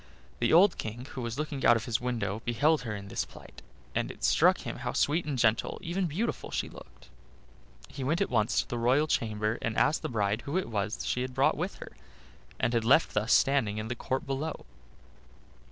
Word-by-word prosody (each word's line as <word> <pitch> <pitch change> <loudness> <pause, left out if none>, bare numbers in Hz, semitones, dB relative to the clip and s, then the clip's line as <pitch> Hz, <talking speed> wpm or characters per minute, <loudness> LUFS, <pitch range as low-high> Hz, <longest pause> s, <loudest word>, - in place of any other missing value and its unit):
The 115 - +2
old 175 +3 +6
King, 115 +3 -5
who 130 - -5
was 120 +1 -4
looking 150 -2 -3
out 120 - +7
of 115 - -5
his 115 -1 -1
window, 115 -4 -2
beheld 145 +5 +2
her 110 -4 -4
in 100 -1 -8
this - - -1
plight, - - -14 0.3
and - - -1
it - - -10
struck - - +4
him - - -5
how - - -4
sweet 160 +4 +1
and 145 -3 -2
gentle, 110 -2 +2
even 180 +2 -1
beautiful, 200 +10 -3
she - - -2
looked. - - -15 0.8
He 135 - -7
went 155 +7 +1
at 200 - 0
once 110 -1 +2
to - - -21
the 120 - -3
royal 130 +6 +3
chamber, 110 -5 -1
and 115 -1 -2
asked 155 - +3
the - - -3
bride 105 -1 0
who 140 +8 -3
it 190 - -2
was 105 0 -2
she 125 - -1
had 130 0 -4
brought - - +3
with - - -3
her - - -10 0.7
and 120 - +1
had 115 -1 +1
left 135 +8 +4
thus 105 +3 0
standing 135 -7 +3
in 110 +1 -4
the 120 - -2
court 130 +2 -3
below. 140 +3 -4
120 Hz, 215 wpm, -29 LUFS, 110-145 Hz, 0.8 s, out